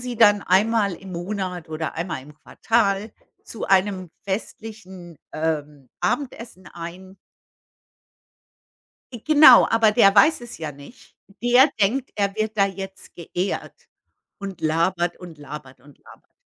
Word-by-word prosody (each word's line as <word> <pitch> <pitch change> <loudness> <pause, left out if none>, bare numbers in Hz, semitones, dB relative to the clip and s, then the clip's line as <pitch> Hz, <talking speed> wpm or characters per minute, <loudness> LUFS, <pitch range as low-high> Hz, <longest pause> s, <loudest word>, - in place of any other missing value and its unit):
sie 245 -1 -5
dann 205 -3 +5
einmal 200 +1 +2
im 190 +2 -11
Monat 180 -1 -5
oder 155 0 -4
einmal 165 -6 -4
im 150 +2 -15
Quartal 200 +5 -1 0.3
zu 225 - -7
einem 190 -2 +1
festlichen, 190 -4 -7
ähm, 150 -4 -4
Abendessen 230 -9 -4
ein. 185 +3 -10 2.0
I 230 - -9
Genau, 300 -5 +8
aber 225 -2 +3
der 200 -4 +5
weiß 310 +7 +5
es 240 - -10
ja 155 -2 -6
nicht. 140 - -16 0.3
Der 250 +4 +5
denkt, 245 +7 +1
er 200 -1 -1
wird 215 0 -3
da 200 - +4
jetzt 195 0 -9
geehrt 175 +3 -5 0.5
und 195 -3 -7
labert 170 +2 0
und 175 -3 -11
labert 140 -3 -10
und 145 +2 -19
labert. - - -19
190 Hz, 130 wpm, -22 LUFS, 170-220 Hz, 2.0 s, Genau